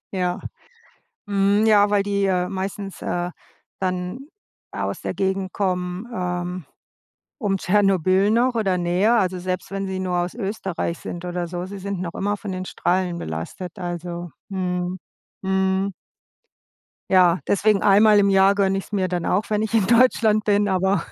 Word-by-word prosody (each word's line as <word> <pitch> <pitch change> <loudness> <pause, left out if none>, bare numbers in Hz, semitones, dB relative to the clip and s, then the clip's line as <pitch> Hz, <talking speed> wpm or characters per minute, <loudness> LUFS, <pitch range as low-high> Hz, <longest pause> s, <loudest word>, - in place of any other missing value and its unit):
ja. 180 -2 -1 0.9
Mhm, 200 +2 +2
ja, 205 -1 +5
weil 205 -1 +4
die, 200 0 0
äh, 180 -1 +1
meistens, 195 0 -5
äh, 175 0 -2 0.5
dann 185 +8 -3 0.4
aus - - -3
der - - -3
Gegend 190 -1 -1
kommen, 180 +1 -2
ähm, 180 - -3 0.7
um 200 -5 0
Tschernobyl 195 0 +3
noch 240 +2 +2
oder 195 -4 +1
näher, 180 +7 +2
also 185 -2 0
selbst 185 +1 -4
wenn 195 0 -3
sie 190 0 -3
nur 180 -1 -1
aus 175 +2 -2
Österreich 195 -6 -3
sind 175 0 -7
oder 175 -1 -3
so. 175 0 -4
Sie 195 +2 -7
sind 195 -1 -4
noch 175 -2 -4
immer 205 +1 -1
von 200 -1 -6
den 185 0 -4
Strahlen 180 -1 0
belastet, 80 - -6
also 175 -1 -5 0.2
Mhm. 180 -1 -2 0.4
Mhm. 190 0 +1 1.2
Ja. 180 -2 +5
Deswegen 200 0 +2
einmal 210 +1 +6
im 200 -1 +4
Jahr 195 +1 +5
gönne 195 -1 +1
ich's 195 - -9
mir 190 -3 0
dann 175 -1 -2
auch, 200 +3 +1
wenn 210 0 +1
ich 220 +1 -3
in 210 -4 +3
Deutschland 225 -2 +4
bin, 205 0 +2
aber 190 -1 +1
190 Hz, 160 wpm, -22 LUFS, 180-200 Hz, 1.2 s, einmal